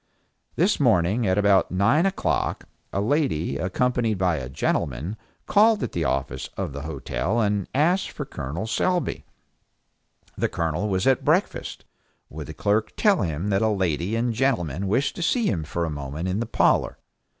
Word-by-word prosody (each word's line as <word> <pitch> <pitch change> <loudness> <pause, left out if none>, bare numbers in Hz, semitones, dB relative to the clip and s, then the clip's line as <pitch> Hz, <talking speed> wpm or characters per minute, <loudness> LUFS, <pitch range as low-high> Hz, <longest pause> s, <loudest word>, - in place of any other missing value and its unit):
This - - +2
morning 95 +6 +3
at 95 +1 +2
about 100 -2 +4
nine 115 - +3
o'clock, 195 - -1 0.2
a - - -1
lady, 105 - 0
accompanied 115 - 0
by 90 -3 +1
a 65 -3 -5
gentleman, 70 - -2 0.3
called 215 +1 +4
at - - -3
the 85 -2 -2
office 65 -1 -2
of - - -3
the 70 - -5
hotel 80 - -2
and 105 -3 0
asked 175 +7 +2
for 145 - -6
Col. 75 - -5
Selby. 180 +10 -1 1.1
The - - 0
Colonel 85 +5 -1
was 95 -1 0
at 135 -2 +3
breakfast. - - 0 0.5
Would 75 -1 -7
the 80 - -8
clerk 105 +5 0
tell 205 -3 +3
him 85 +2 -2
that 95 -1 +2
a 110 - +3
lady 95 -1 0
and 115 +1 0
gentleman 100 - 0
wished 130 +8 +1
to - - -4
see 235 +7 +1
him 85 - 0
for 85 +3 -2
a 80 - -3
moment 75 +4 -4
in 95 +3 -1
the 115 - -2
parlor? - - +2
95 Hz, 170 wpm, -24 LUFS, 80-120 Hz, 1.1 s, about